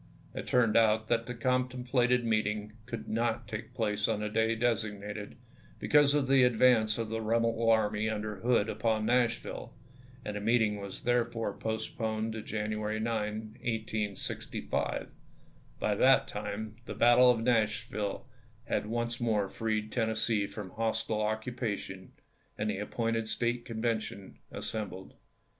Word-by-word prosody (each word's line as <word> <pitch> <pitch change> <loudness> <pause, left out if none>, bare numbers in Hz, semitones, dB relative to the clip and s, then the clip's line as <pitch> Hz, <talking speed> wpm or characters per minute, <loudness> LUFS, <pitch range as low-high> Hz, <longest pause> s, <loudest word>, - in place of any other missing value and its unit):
It - - -6
turned 115 -4 +3
out 110 -1 +4
that 115 -1 +1
the 125 - -4
contemplated 125 0 +1
meeting 105 -1 0
could 115 -2 -6
not 115 +1 -1
take 110 +1 -6
place 105 -2 0
on 110 -2 0
the 105 - -2
day 110 +1 +2
designated 105 -3 -2 0.4
be - - -4
cause 145 -1 +6
of 140 -3 +2
the 135 0 +5
advance 120 -3 +4
of 115 -2 -3
the 115 0 -2
rebel 115 +1 +1
army 110 -1 +2
under 105 -1 -3
Hood 115 0 +2
upon 110 -1 0
Nash\'ille, 120 0 0 0.5
and 105 - -4
the 105 - -3
meeting 110 -1 +2
was 100 -1 -7
therefore 115 -3 0
postponed 110 0 -2
to 110 - -4
January 110 0 -2
9, 110 0 -3
1865. 110 -3 -2 0.7
By 105 - +1
that 130 +6 +5
time 105 +1 -5
the - - -5
battle 120 +1 +6
of 120 -2 +3
Nashville 110 -2 0 0.4
had - - -1
once 120 +1 -2
more 105 -4 +1
freed 110 +1 -2
Tennessee 110 -2 +1
from 100 -2 -7
hostile 110 -1 -1
occupation, 110 -3 -3 0.4
and 105 0 0
the 95 - -4
appointed 115 +1 -1
State 120 +1 -1
Convention 110 -3 -3
assembled. 95 -3 -5
110 Hz, 140 wpm, -31 LUFS, 105-120 Hz, 0.7 s, cause